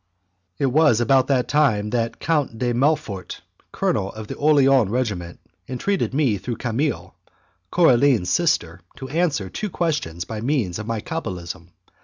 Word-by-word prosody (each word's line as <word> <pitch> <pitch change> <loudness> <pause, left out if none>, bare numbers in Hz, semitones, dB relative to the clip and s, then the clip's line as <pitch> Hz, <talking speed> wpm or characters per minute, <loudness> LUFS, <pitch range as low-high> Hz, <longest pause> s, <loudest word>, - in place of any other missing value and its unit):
It - - 0
was 135 -3 +4
about 130 +1 +3
that 130 -3 +1
time 110 -9 +2
that 115 0 0
the - - -23
Count 150 -8 -1
de 120 +1 0
Melfort, 120 - -1 0.3
colonel 95 - -1
of 110 0 -7
the - - -5
Orleans 135 -6 +4
regiment, 100 -8 -3 0.3
entreated 190 +10 -1
me 130 -8 +1
through 120 +4 -4
Camille, 125 +4 -2 0.6
Coraline's 125 - +3
sister, 90 - +1 0.2
to 130 - -8
answer 150 - 0
two 210 - -4
questions 145 - -2
by 110 -1 -6
means 115 - -1
of 110 - -6
my 115 -2 -2
cabalism. 90 - -6
125 Hz, 150 wpm, -22 LUFS, 105-145 Hz, 0.6 s, was